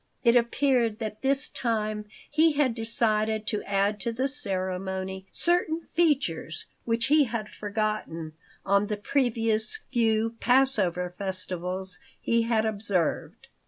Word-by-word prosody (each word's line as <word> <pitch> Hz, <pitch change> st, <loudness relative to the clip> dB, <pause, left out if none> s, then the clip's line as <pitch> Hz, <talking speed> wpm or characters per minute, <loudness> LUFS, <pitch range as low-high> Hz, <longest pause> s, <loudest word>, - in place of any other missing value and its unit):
It 235 Hz, -1 st, +5 dB
appeared 240 Hz, -2 st, +2 dB
that 215 Hz, -2 st, -5 dB
this 270 Hz, 0 st, +1 dB
time 215 Hz, -3 st, -2 dB, 0.2 s
he 315 Hz, +1 st, +3 dB
had 280 Hz, -4 st, +2 dB
decided 220 Hz, -1 st, +1 dB
to 210 Hz, -, -1 dB
add 200 Hz, +1 st, +1 dB
to 235 Hz, -, -1 dB
the 255 Hz, +4 st, 0 dB
ceremony 190 Hz, -5 st, -3 dB
certain 340 Hz, -2 st, +2 dB
features 275 Hz, -, 0 dB, 0.2 s
which 230 Hz, 0 st, +1 dB
he 295 Hz, +1 st, +5 dB
had 225 Hz, -3 st, -4 dB
foregone 205 Hz, -7 st, -3 dB, 0.3 s
on 200 Hz, +1 st, +3 dB
the 210 Hz, -1 st, -2 dB
previous 230 Hz, -, 0 dB
few 225 Hz, -2 st, +1 dB
Passover 205 Hz, -9 st, +2 dB
festivals 185 Hz, -3 st, -2 dB, 0.2 s
he 230 Hz, 0 st, +1 dB
had 225 Hz, -1 st, +1 dB
observed. 200 Hz, -5 st, -1 dB
220 Hz, 125 wpm, -27 LUFS, 195-245 Hz, 0.3 s, It